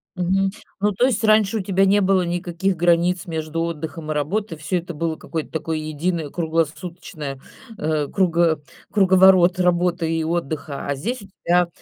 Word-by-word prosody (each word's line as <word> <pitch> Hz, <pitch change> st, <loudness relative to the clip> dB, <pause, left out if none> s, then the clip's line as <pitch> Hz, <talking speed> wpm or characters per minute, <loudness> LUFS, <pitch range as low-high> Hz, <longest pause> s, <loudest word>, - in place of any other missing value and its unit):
Мгм, 190 Hz, +2 st, +1 dB, 0.3 s
ну, 205 Hz, +1 st, +2 dB
то 245 Hz, +7 st, +2 dB
есть 230 Hz, -4 st, 0 dB
раньше 215 Hz, 0 st, +4 dB
у -, -, -1 dB
тебя 195 Hz, +1 st, +2 dB
не 200 Hz, +1 st, +4 dB
было 190 Hz, -1 st, +3 dB
никаких 175 Hz, +2 st, -1 dB
границ 175 Hz, +1 st, +2 dB
между 160 Hz, 0 st, -3 dB
отдыхом 160 Hz, -1 st, -4 dB
и -, -, +1 dB
работой, 165 Hz, +4 st, -2 dB
всё 180 Hz, +4 st, -1 dB
это 175 Hz, -1 st, -6 dB
было 165 Hz, 0 st, -1 dB
какой-то 160 Hz, -1 st, -5 dB
такой 160 Hz, 0 st, -2 dB
единый 155 Hz, 0 st, -2 dB
круглосуточная, 160 Hz, -3 st, -3 dB, 0.4 s
э, 150 Hz, -2 st, -1 dB
круго 170 Hz, -4 st, +2 dB, 0.3 s
круговорот 185 Hz, -2 st, +5 dB
работы 175 Hz, -1 st, +1 dB
и 165 Hz, -1 st, 0 dB
отдыха. 155 Hz, -4 st, -3 dB
А 140 Hz, -, 0 dB
здесь 235 Hz, -, -3 dB
у 200 Hz, -, -12 dB, 0.2 s
тебя, 175 Hz, 0 st, +4 dB
175 Hz, 160 wpm, -22 LUFS, 160-190 Hz, 0.4 s, круговорот